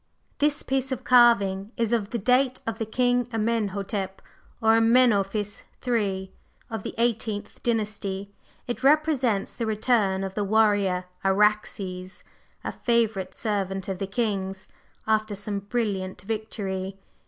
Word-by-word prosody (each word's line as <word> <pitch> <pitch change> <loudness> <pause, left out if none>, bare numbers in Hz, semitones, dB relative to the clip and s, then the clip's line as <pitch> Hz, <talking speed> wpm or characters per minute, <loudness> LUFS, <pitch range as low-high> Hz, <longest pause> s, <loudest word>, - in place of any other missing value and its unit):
"This 295 0 +2
piece 265 0 -1
of 260 - -3
carving 210 -5 +4
is 230 -1 +1
of 210 -4 0
the 235 - -2
date 255 +4 +2
of 225 -3 -3
the 225 - -2
King 245 +1 +1
Amenhotep 205 -3 -1 0.4
or 225 -1 +4
Amenophis 220 -3 +3 0.2
III., 200 -6 -1 0.4
of 220 -3 -3
the - - -6
Eighteenth 225 -3 -1
Dynasty. 205 -4 -2 0.3
It 240 -1 -4
represents 275 -8 +3
the 230 -2 -3
return 210 -3 +1
of 190 -1 -4
the 205 - -1
warrior 200 -3 +2 0.2
Araxes, 195 -2 0 0.4
a - - -3
favorite 220 -6 0
servant 195 -3 -2
of 190 -2 -3
the 195 - -2
king's, 195 -3 -2 0.4
after 215 -1 +1
some 200 0 -3
brilliant 200 -4 -2
victory. 195 -3 -4
210 Hz, 130 wpm, -26 LUFS, 195-235 Hz, 0.4 s, carving